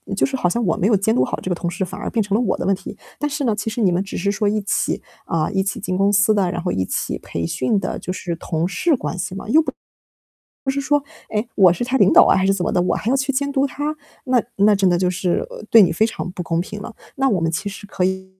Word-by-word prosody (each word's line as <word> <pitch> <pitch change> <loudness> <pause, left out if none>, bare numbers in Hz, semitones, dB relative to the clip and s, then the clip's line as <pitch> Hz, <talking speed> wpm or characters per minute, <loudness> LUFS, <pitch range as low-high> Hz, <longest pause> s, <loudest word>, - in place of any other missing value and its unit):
就 - - +3
是 270 - -3
好 180 -9 +1
像 235 +6 -1
我 165 - +2
没 190 - +2
有 220 - +4
监 205 +3 +1
督 - - +3
好 - - -3
这 - - -4
个 180 - 0
同 175 0 -3
事 180 +2 -2
反 180 - -8
而 - - -3
变 230 - 0
成 200 0 -1
了 225 - +2
我 240 - 0
的 - - -3
问 195 - +3
题。 190 - -9 0.2
但 295 - -1
是 295 0 -3
呢， 230 -5 +1
其 220 +1 -3
实 225 +2 -3
你 190 -4 +4
们 175 +2 0
只 200 - -6
是 200 +3 0
说 205 +1 0
一 210 +1 0
起 200 - -1 0.2
啊， 160 -1 0
一 190 -1 +1
起 195 0 -3
进 185 - -3
公 195 +1 +3
司 205 +1 +4
的， 195 -4 +1
然 175 -1 -3
后 180 0 -1
一 95 - 0
起 - - -2
培 85 - -4
训 130 - 0
的， - - -4
就 - - -5
是 175 -2 -4
同 165 0 -2
事 315 - +1
关 215 - -4
系 180 +1 -4
嘛， 195 - -7
又 310 +7 +6 0.9
不 270 - -5
是 275 +1 -1
说， 290 0 +1 0.3
哎， 215 +2 -1
我 185 -4 +6
是 240 - -2
他 255 +2 0
领 200 -6 +5
导 - - +9
啊 - - +4
还 190 - +2
是 195 - +4
怎 190 -2 -1
么 - - -1
的， 180 - +2
我 180 - +1
还 220 - -3
要 270 - +3
去 270 0 0
监 280 +1 -1
督 275 0 +2
他， 290 +3 -3 0.3
那 255 -3 +2
那 205 +1 +5
真 195 -2 +3
的 175 - +2
就 180 0 +1
是 180 - -1 0.2
对 230 - +8
你 175 -3 +3
非 190 +7 +2
常 220 -4 -5
不 180 - -5
公 165 -1 -1
平 205 +3 -6
了。 225 - -8 0.2
那 270 0 +2
我 195 -8 +1
们 165 0 +1
其 170 +5 -2
实 200 +1 -9
可 190 -2 -2
以 190 0 -1
200 Hz, 325 characters per minute, -20 LUFS, 180-235 Hz, 0.9 s, 导